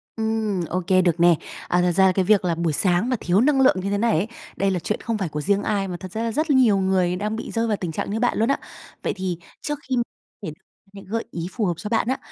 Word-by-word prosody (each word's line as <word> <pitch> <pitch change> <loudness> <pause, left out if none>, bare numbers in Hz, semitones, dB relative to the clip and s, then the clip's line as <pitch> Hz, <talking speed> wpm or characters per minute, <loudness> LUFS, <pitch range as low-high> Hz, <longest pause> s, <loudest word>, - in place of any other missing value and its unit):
Ừm, 220 -3 -1
ô 185 +1 -1
kê, 185 -1 +5
được 175 -2 +1
nè. 170 -1 +6 0.3
À, 180 0 +2
thật 180 - +2
ra 190 +2 +4
là 190 - +5
cái 185 0 0
việc 200 -1 +4
là 170 - +1
buổi 165 -2 -1
sáng 185 - +2
mà 250 - +2
thiếu 180 +4 +2
năng 275 +1 +3
lượng 265 - +5
như 195 +2 -3
thế 205 - 0
này 230 +2 +2
ấy, 195 +7 0 0.3
đây 195 0 +1
là 180 - 0
chuyện 210 - -3
không 230 -2 -2
phải 190 -5 -2
của 150 0 -4
riêng 200 +5 +1
ai 200 -3 0
mà 180 - -5
thật 185 0 -9
ra 220 +4 -3
là 230 - -1
rất 310 +6 -1
nhiều 250 -7 +5
người 190 -2 +1
đang 210 +3 -2
bị 225 - -6
rơi 230 0 0
vào 210 -2 0
tình 175 -3 -4
trạng 160 - -3
như 220 - -1
bạn 245 0 +1
luôn 225 +3 +2
á. - - +1 0.4
Vậy - - 0
thì 185 -3 -3 0.2
trước 295 -1 -3
khi 260 - +1 0.5
thể 155 - -4 0.4
những 195 - -11
gợi 225 +4 -3
ý 170 0 -4
phù 220 -1 -1
hợp 175 - +1
cho 210 - -6
bạn 230 0 +1
á, 260 - 0
195 Hz, 290 wpm, -23 LUFS, 180-225 Hz, 0.5 s, nè